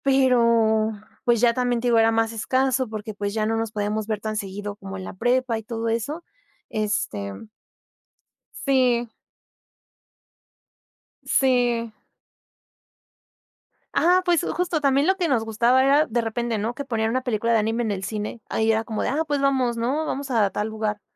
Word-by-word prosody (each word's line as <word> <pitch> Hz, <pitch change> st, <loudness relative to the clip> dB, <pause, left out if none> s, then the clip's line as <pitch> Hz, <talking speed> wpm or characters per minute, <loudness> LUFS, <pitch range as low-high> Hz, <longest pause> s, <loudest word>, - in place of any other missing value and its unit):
Pero 235 Hz, -5 st, +3 dB, 0.3 s
pues, 235 Hz, -2 st, +3 dB
ya 240 Hz, -1 st, +5 dB
también, 245 Hz, -1 st, 0 dB
te 245 Hz, -, -2 dB
digo, 235 Hz, -1 st, +4 dB
era 225 Hz, 0 st, +4 dB
más 225 Hz, 0 st, +1 dB
escaso 260 Hz, +3 st, 0 dB
porque, 215 Hz, 0 st, -6 dB
pues, 205 Hz, 0 st, -3 dB
ya 215 Hz, -1 st, 0 dB
no 225 Hz, +1 st, 0 dB
nos 225 Hz, -1 st, -2 dB
podíamos 210 Hz, 0 st, -2 dB
ver 215 Hz, -2 st, -2 dB
tan 215 Hz, 0 st, -4 dB
seguido 205 Hz, 0 st, -5 dB
como 195 Hz, -1 st, -8 dB
en 190 Hz, -, -7 dB
la -, -, -7 dB
prepa 245 Hz, +3 st, +1 dB
y -, -, -11 dB
todo 225 Hz, +1 st, -3 dB
eso. 260 Hz, +9 st, -2 dB, 0.5 s
Este 110 Hz, -, -2 dB, 1.3 s
Sí. 245 Hz, -4 st, +2 dB, 2.1 s
Sí. 245 Hz, -3 st, +2 dB, 2.0 s
Ajá, 360 Hz, +2 st, +4 dB
pues, 350 Hz, -3 st, +2 dB
justo 345 Hz, -2 st, 0 dB
también 280 Hz, 0 st, +2 dB
lo 380 Hz, +2 st, +3 dB
que 355 Hz, -3 st, 0 dB
nos 250 Hz, -7 st, +1 dB
gustaba 235 Hz, +4 st, +3 dB
era 285 Hz, +3 st, +4 dB
de 235 Hz, -3 st, -1 dB
repente, 230 Hz, 0 st, -2 dB
¿no? 220 Hz, +3 st, -2 dB
Que 280 Hz, +2 st, -6 dB
ponían 225 Hz, -4 st, -1 dB
una 255 Hz, +3 st, 0 dB
película 230 Hz, -2 st, 0 dB
de 230 Hz, -, +4 dB
anime 225 Hz, +3 st, 0 dB
en 220 Hz, -, -1 dB
el 190 Hz, -1 st, -4 dB
cine, 215 Hz, +2 st, -4 dB
ahí 225 Hz, 0 st, +2 dB
era 220 Hz, 0 st, 0 dB
como 220 Hz, -2 st, -3 dB
de, -, -, 0 dB
ah, 305 Hz, +4 st, 0 dB
pues, 290 Hz, -2 st, 0 dB
vamos, 260 Hz, -3 st, +1 dB
¿no? 260 Hz, +7 st, -1 dB
Vamos 275 Hz, -2 st, -4 dB
a 220 Hz, -5 st, +3 dB
tal 210 Hz, -, -2 dB
lugar 215 Hz, -1 st, -3 dB
230 Hz, 175 wpm, -24 LUFS, 215-260 Hz, 2.1 s, ya